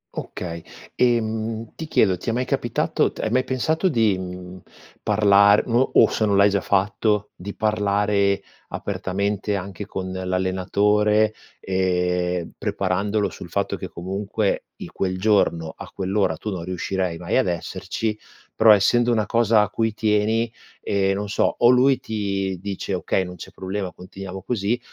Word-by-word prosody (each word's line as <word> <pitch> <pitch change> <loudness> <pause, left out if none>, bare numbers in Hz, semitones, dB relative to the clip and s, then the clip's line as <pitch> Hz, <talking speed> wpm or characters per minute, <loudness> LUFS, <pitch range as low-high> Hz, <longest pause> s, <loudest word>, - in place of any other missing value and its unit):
Okay, 85 -2 -6 0.3
ehm, 115 -2 0
ti 160 - -6
chiedo, 95 -10 +3
ti 115 - -5
è - - 0
mai 125 +2 -1
capitato - - 0
t - - -18
hai 110 - -1
mai 130 +2 +3
pensato 160 +8 0
di, 115 - +2
mhmm, 90 0 -8 0.4
parlar 100 -1 +5
o 125 +2 +2
o - - +6
se 110 - 0
non 100 -1 +2
l'hai 100 +1 +5
già 100 -1 +1
fatto, 105 +2 +1
di 100 +3 -8
parlare 105 -2 +1 0.3
apertamente 100 +2 -2
anche 100 +1 -6
con 95 -3 -5
l'allenatore, 100 +3 +1 0.3
ehm, 90 -2 0
preparandolo 100 +2 -1
sul - - -10
fatto - - -1
che - - -6
comunque 100 +3 -2 0.2
in - - -9
quel 95 -1 -2
giorno 95 -5 +1
a - - -9
quell'ora, 95 -3 0
tu 105 - -5
non 90 -3 -4
riuscirai 90 0 -2
mai 90 +4 -1
ad 130 - +2
esserci, 100 +5 -3 0.4
però, 110 0 +6
essendo 120 +4 +4
una 110 -3 +1
cosa 115 -1 +3
a 105 - -3
cui 110 -1 -1
tieni, 110 +1 +1 0.3
ehm, 95 -1 +1
non 100 +1 -3
so, 100 - +1
o 120 - +5
lui 130 +1 +4
ti 100 -3 -2
dice: 100 0 -4
"Okay, 95 +1 0
non 90 0 -8
c'è - - -9
problema 95 0 -4
continuiamo 95 +1 -9
così". 115 +1 -1
100 Hz, 155 wpm, -23 LUFS, 95-110 Hz, 0.4 s, o